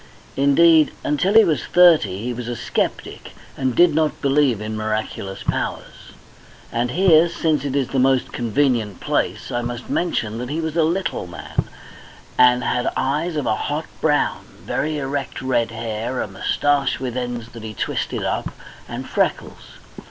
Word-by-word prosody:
Indeed, 155 +3 +5
until 180 +8 +1
he 225 - +9
was 150 - 0
thirty 150 - +4
he 125 +1 -2
was 120 0 -6
a 120 - -3
sceptic, - - -3 0.2
and 130 -3 -1
did 175 -2 +5
not 155 0 0
believe 140 -5 +2
in 110 +1 -4
miraculous 110 -2 -3
powers. - - -4 0.6
And 120 +1 -1
here, 170 +2 +5
since 155 -4 0
it 140 -1 -3
is 135 -3 0
the 135 - 0
most 130 0 +2
convenient 120 -4 0
place, - - -2
I 120 - -1
must 120 0 -5
mention 115 -10 -1
that 125 +1 -5
he 155 +3 -2
was 160 -1 -3
a 165 - +3
little 170 - -1
man, 85 -4 -4 0.7
and 125 0 +5
had 125 0 0
eyes 155 +5 -1
of 150 -3 -1
a - - +2
hot 150 +8 -3 0.2
brown, 150 -2 +1 0.2
very 155 +1 -1
erect 140 0 -3
red 120 -3 0
hair, 115 +2 -4
a - - -2
moustache 140 +8 0
with 125 -2 -4
ends 120 -2 -4
that 115 0 -11
he 110 -1 -7
twisted - - -2
up, - - -2 0.4
and - - -6
freckles. - - -2
130 Hz, 165 wpm, -21 LUFS, 115-155 Hz, 0.7 s, he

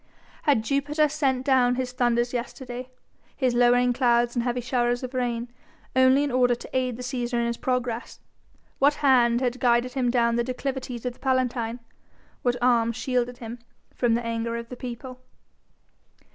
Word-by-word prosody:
Had 230 -6 +4
Jupiter 290 +4 +1
sent 270 -4 0
down 250 -2 +3
his 255 -1 -2
thunders 240 -1 +1
yesterday, 250 +1 -5 0.5
his 255 -3 +1
lowering 245 0 +4
clouds 240 -1 +2
and 240 - +1
heavy 245 +1 -1
showers 245 0 0
of 255 +1 -5
rain, 240 -2 -1 0.5
only 260 +2 +5
in 290 - -1
order 245 -1 +3
to - - -11
aid 255 -2 0
the 250 - -7
Cæsar 245 -1 -3
in 235 0 +1
his 235 0 -1
progress? 250 -2 -2 0.6
What 285 +2 +4
hand 240 -3 +4
had 250 -1 -1
guided 245 0 +2
him 255 -3 0
down 235 -1 +2
the 235 - +2
declivities 255 -1 -4
of 250 - -2
the - - -24
Palatine? 250 -3 -1 0.6
What 245 -1 +1
arm 235 -2 +3
shielded 245 0 -1
him 235 -1 -8 0.3
from 235 -2 +1
the 235 0 -2
anger 230 0 -2
of 235 0 -7
the 250 - -7
people? 250 +1 -8
245 Hz, 170 wpm, -25 LUFS, 240-255 Hz, 0.6 s, only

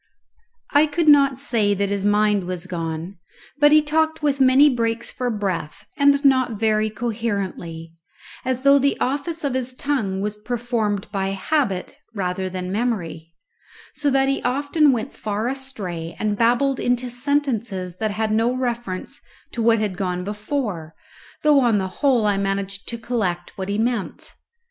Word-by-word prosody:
I 295 +2 +5
could 315 +2 -1
not 280 -3 +6
say 225 -7 +1
that 200 0 -1
his 200 -1 -2
mind 205 -2 +2
was 180 -1 -5
gone, 170 0 -5 0.4
but 295 0 +6
he 305 0 +6
talked 315 +1 0
with 280 -2 +1
many 265 +3 +6
breaks 230 -3 -1
for 250 -1 -2
breath, 195 -8 -3
and 280 0 +3
not 255 -5 +3
very 215 -1 +2
coherently, 200 -8 -4 0.5
as 260 0 -2
though 280 0 +6
the 280 +1 +1
office 305 +5 -2
of 280 -3 0
his 255 0 -2
tongue 250 -10 -1
was 210 +1 -3
performed 225 -3 -2
by 195 -2 -1
habit 195 - -1 0.2
rather 185 -1 -2
than 185 0 -5
memory, 175 -8 -3 0.6
so 290 -1 0
that 270 0 +2
he 275 - 0
often 285 +3 +2
went 230 -4 -2
far 215 +2 -3
astray 210 -12 -4
and 210 -1 -1
babbled 245 +5 +2
into 245 0 0
sentences 240 -9 -1
that 220 +1 -1
had 215 +1 -1
no 225 +3 +2
reference 240 -7 -4 0.3
to 235 - -3
what 230 0 +4
had 210 -4 -2
gone 180 -1 -2
before, 205 - -4 0.5
though 300 -2 +5
on 235 -5 +3
the 190 -1 -1
whole 255 -6 +3
I 205 -1 +2
managed 195 0 -2
to 235 - -4
collect 210 -7 -3
what 190 0 -5
he 200 - -1
meant. 230 -2 -2
225 Hz, 160 wpm, -22 LUFS, 195-265 Hz, 0.6 s, not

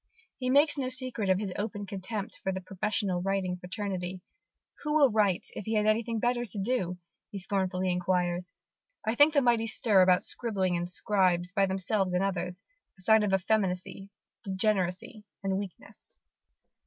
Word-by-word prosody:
He 255 -1 -1
makes 290 +2 +4
no 255 -2 -1
secret 255 -5 -1
of 185 - +4
his 195 -2 -3
open 205 -1 -4
contempt 200 +3 -5
for 190 - -1
the 190 - -3
professional 190 -1 -1
writing 190 -1 -1
fraternity. 185 -1 -4 0.6
"Who 300 0 -1
would 280 -7 +5
write, 205 -5 +2
if 205 - -7
he 220 - -1
had 210 0 +2
anything 225 +2 +1
better 240 +1 +1
to 210 -3 -8
do?" 195 -4 -1 0.3
he 205 - -7
scornfully 185 -1 -1
enquires, 180 0 -1 0.5
"I 220 - +1
think 290 +5 +5
the 285 - +4
mighty 235 -2 +2
stir 215 -3 +3
made 185 0 +6
about 180 +2 +2
scribbling 195 -6 -1
and 175 0 -2
scribes, 180 -2 +2
by 195 +1 +2
themselves 190 0 0
and 180 - +2
others, 180 -1 -3 0.3
a - - -3
sign 220 +2 +6
of 210 -2 0
effeminacy, 190 -1 0 0.3
degeneracy, 195 +1 -1 0.2
and 195 0 0
weakness." 200 -4 -10
195 Hz, 165 wpm, -29 LUFS, 185-220 Hz, 0.6 s, made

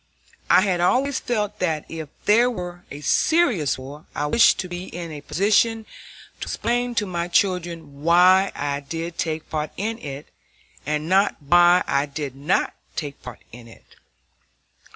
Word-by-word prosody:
I - - +6
had 185 -3 0
always 265 +9 +2
felt 210 -4 -2
that 160 -4 -1
if 160 -3 -7 0.2
there 235 +4 +5
were 180 -6 -7
a 145 - -8
serious 220 - +2
war 140 +4 -10
I 145 - -1
wished 230 +11 +5
to 185 - -7
be 175 +1 -6
in 170 -2 -7
a 150 -2 -7
position 215 +7 +1 0.5
to - - -4
explain 245 +1 -1
to 210 -2 +1
my 175 -2 -3
children 170 -6 -1
why 180 +4 +5
I 145 0 -2
did 165 +4 -6
take 160 -1 -2
part 155 -1 -2
in 225 +4 -3
it, 140 -3 -8 0.6
and 150 +1 -1
not 195 +3 +3
why 175 +4 +5
I 140 +1 0
did 140 -2 -5
not 145 +7 0 0.2
take 145 -3 -5
part 125 -2 -10
in 115 0 -12
it. 115 - -18
175 Hz, 160 wpm, -23 LUFS, 150-200 Hz, 0.6 s, I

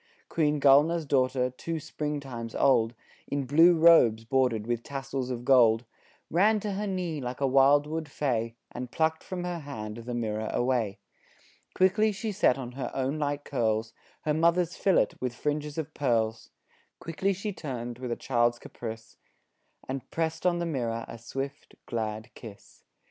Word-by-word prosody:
Queen 150 -2 +1
Gulnaar's 150 +4 +5
daughter 130 -2 +1
two 165 +6 -4
spring 150 -1 -4
times 120 -5 -7
old, 120 -4 +3 0.3
In 140 -1 -2
blue 165 +6 +6
robes 125 -10 +6
bordered 125 -3 +1
with 120 0 -1
tassels 135 -1 -4
of 120 -1 -4
gold, 120 -3 +5 0.5
Ran 210 +6 +4
to 210 - -3
her 205 +2 -2
knee 180 -6 -2
like 125 0 -5
a 140 - +1
wildwood 145 +4 +3
fay, 115 -5 -1 0.2
And 125 0 -6
plucked 160 +3 0
from 180 -1 -5
her 175 -1 -3
hand 110 -8 -7
the 120 +1 -5
mirror 110 -2 -2
away. 120 -5 0 0.8
Quickly 210 +4 +3
she 210 +2 -4
set 160 -9 +3
on 125 -2 -6
her 130 +1 -4
own 135 +3 -1
light 145 -1 -1
curls 110 -4 -1 0.3
Her 150 - 0
mother's 170 +2 +2
fillet 190 -3 +3
with 125 -1 -3
fringes 150 +2 -2
of 160 -3 -4
pearls; 115 -5 0 0.5
Quickly 180 +4 -1
she 200 +2 -3
turned 120 -7 -6
with 125 -2 -4
a - - 0
child's 120 -1 +1
caprice 115 -2 -8 0.7
And 135 0 -5
pressed 160 +1 -1
on 175 -1 +2
the 170 - -1
mirror 120 -7 -2
a 115 - -9
swift, 135 +4 -6
glad 110 0 -4
kiss. 110 -4 -13
135 Hz, 160 wpm, -28 LUFS, 120-160 Hz, 0.8 s, blue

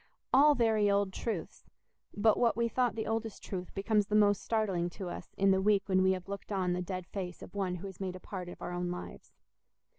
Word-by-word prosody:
All 290 +3 +7
very 220 -4 +3
old 200 -1 +1
truths—but 210 +2 -2
what 235 -2 +3
we 235 0 +2
thought 245 +1 +1
the 220 - -2
oldest 225 -1 -3
truth 180 -2 -5
becomes 205 +1 +1
the 210 - 0
most 205 -2 +4
startling 195 -6 0
to 185 -3 -4
us - - -8
in 195 0 +4
the 190 0 +3
week 200 -1 +3
when 185 -1 +3
we 190 0 +4
have 185 -1 -6
looked 200 +1 -7
on 185 -3 +1
the 180 - -1
dead 185 0 -4
face 180 -1 -6
of - - -11
one 190 -3 -1
who 180 +2 -7
has 190 -2 -8
made 185 -1 -3
a - - -8
part 180 -1 -6
of - - -10
our - - -4
own 175 0 -2
lives. 180 0 -7
195 Hz, 230 wpm, -32 LUFS, 185-215 Hz, -, All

